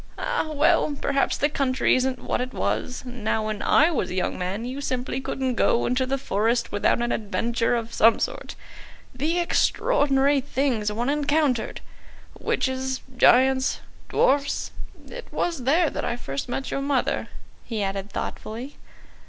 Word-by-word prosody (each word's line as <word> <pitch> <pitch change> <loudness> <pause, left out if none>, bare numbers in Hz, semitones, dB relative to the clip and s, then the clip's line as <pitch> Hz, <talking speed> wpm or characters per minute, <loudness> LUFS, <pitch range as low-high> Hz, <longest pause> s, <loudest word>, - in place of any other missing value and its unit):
"Ah, 315 - -1
well, 305 -1 +2
perhaps 275 -1 +1
the 290 - +2
country 270 -3 +1
isn't 255 0 0
what - - -2
it 255 0 -5
was. 250 - -2
Now 225 -3 -2
when 215 -1 -3
I 315 +4 +4
was 235 - -1
a 180 - -4
young 185 - -1
man, 190 +5 -3
you 260 +3 -5
simply 255 -1 -2
couldn't 265 -1 -2
go 235 - +2
into 255 +1 +1
the 275 +1 0
forest 230 -1 0
without 205 +3 +1
an 240 - -1
adventure 230 +2 0
of 230 0 -4
some 225 +1 +5
sort. - - -4 0.6
The 305 +7 -1
extraordinary 285 - +2
things 255 -6 0
one 240 +6 -1
encountered! 290 -4 0 0.6
Witches, 260 0 -1
giants, 260 +2 +4 0.3
dwarfs. 280 +1 +1 0.4
It - - -9
was 330 -8 -2
there 315 +4 +3
that - - -4
I - - -1
first 140 - -5
met 270 +2 -3
your 275 - -1
mother," 275 -2 0 0.4
he 220 -3 -3
added 195 +1 -3
thoughtfully. 235 +7 -6
255 Hz, 150 wpm, -24 LUFS, 230-280 Hz, 0.6 s, some